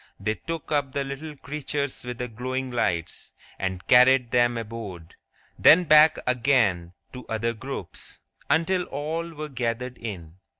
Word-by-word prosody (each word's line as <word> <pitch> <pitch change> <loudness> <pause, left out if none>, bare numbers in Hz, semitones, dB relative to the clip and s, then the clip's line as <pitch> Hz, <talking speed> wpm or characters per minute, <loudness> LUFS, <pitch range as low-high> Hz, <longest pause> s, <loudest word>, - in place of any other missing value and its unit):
They 105 +2 -1
took 165 +6 -7
up 140 -3 0
the 140 - -1
little 140 +3 -7
creatures 145 -1 -4
with 125 -1 -6
the 125 - -3
glowing 130 +3 -4
lights, 85 -9 -2 0.3
and 95 -1 -3
carried 125 -1 +5
them 120 -1 +3
aboard; 105 -7 -7 0.5
then 180 +3 +7
back 155 -1 +6
again 115 -9 +1 0.2
to 125 -1 -8
other 115 +1 -1
groups, 120 -5 -8 0.3
until 180 +2 +2
all 160 +4 -4
were 155 -1 -6
gathered 125 -2 -3
in. 90 -7 -7
125 Hz, 140 wpm, -25 LUFS, 110-145 Hz, 0.5 s, then